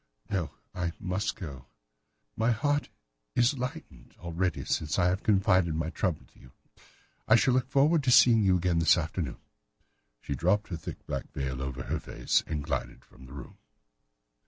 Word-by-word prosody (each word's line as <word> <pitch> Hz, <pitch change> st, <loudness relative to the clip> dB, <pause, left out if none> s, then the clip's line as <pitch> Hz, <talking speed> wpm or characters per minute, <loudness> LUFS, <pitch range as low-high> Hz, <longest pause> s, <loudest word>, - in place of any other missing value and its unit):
"No, 90 Hz, -6 st, -1 dB, 0.2 s
I 85 Hz, -2 st, -2 dB
must 95 Hz, +2 st, -2 dB
go. 70 Hz, -8 st, -8 dB, 0.7 s
My 115 Hz, +2 st, +1 dB
heart 145 Hz, +5 st, 0 dB, 0.5 s
is 125 Hz, +3 st, +3 dB
lightened 120 Hz, -, -7 dB
already 85 Hz, -4 st, -2 dB
since 75 Hz, -1 st, -1 dB
I 90 Hz, -, +3 dB
have 95 Hz, +2 st, -1 dB
confided 95 Hz, -5 st, +3 dB
my 80 Hz, 0 st, -2 dB
trouble 90 Hz, -5 st, -2 dB
to -, -, -22 dB
you. 60 Hz, -, -17 dB, 0.7 s
I -, -, +7 dB
shall 125 Hz, +2 st, +3 dB
look 130 Hz, 0 st, +1 dB
forward 145 Hz, +3 st, +3 dB
to -, -, +3 dB
seeing 120 Hz, -2 st, +7 dB
you 95 Hz, -3 st, +4 dB
again 90 Hz, -1 st, +1 dB
this 80 Hz, -, +5 dB
afternoon." 80 Hz, -4 st, -3 dB, 0.8 s
She 70 Hz, -, -4 dB
dropped 95 Hz, +10 st, +1 dB
her 90 Hz, -, -3 dB
thick 80 Hz, -, -8 dB
black -, -, -5 dB
veil 65 Hz, -1 st, -3 dB
over 65 Hz, -1 st, -4 dB
her -, -, -2 dB
face -, -, 0 dB
and 75 Hz, -3 st, -3 dB
glided 70 Hz, -3 st, -4 dB
from 65 Hz, -, -16 dB
the 65 Hz, -, -12 dB
room. 70 Hz, -2 st, -10 dB
90 Hz, 170 wpm, -29 LUFS, 75-110 Hz, 0.8 s, I